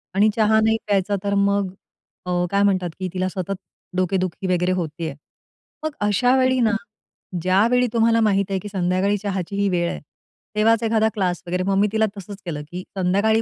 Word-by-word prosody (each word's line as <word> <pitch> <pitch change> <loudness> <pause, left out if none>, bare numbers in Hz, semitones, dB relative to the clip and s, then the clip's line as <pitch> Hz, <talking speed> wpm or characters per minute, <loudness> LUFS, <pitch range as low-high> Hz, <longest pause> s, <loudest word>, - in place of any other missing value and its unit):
आणि 205 +2 +5
चहा 220 -1 +4
नाही 220 0 +3
प्यायचा 200 0 +1
तर 200 0 0
मग 200 -1 +1 0.5
अ, 180 0 0
काय 200 0 +3
म्हणतात 185 -3 +2
की 185 - -2
तिला 185 0 0
सतत 190 +1 -3 0.4
डोकेदुखी 185 0 -1
वगैरे 180 0 +1
होत 170 -3 -1
आहे. 160 -4 -3 0.7
मग 310 - -1 0.2
अशावेळी 255 +5 +3
ना, 225 -2 +3 0.7
ज्यावेळी 225 +8 +3
तुम्हाला 230 0 +3
माहिती 200 -2 +2
आहे 190 - 0
की - - -5
संध्याकाळी 190 +1 +1
चहाची 195 -2 -3
ही 200 0 +1
वेळ 175 -2 +1
आहे, - - -5 0.6
तेव्हाच 225 +2 +3
एखादा 220 -1 +2
क्लास 180 -4 -1
वगैरे. 180 +1 -1
मग 195 +1 +1
मी 205 - +4
तिला 220 0 +2
तसंच 200 +1 -9
केलं 155 -4 -4
की 180 +1 -5
संध्याकाळी 200 +5 +2
200 Hz, 180 wpm, -22 LUFS, 185-220 Hz, 0.7 s, आणि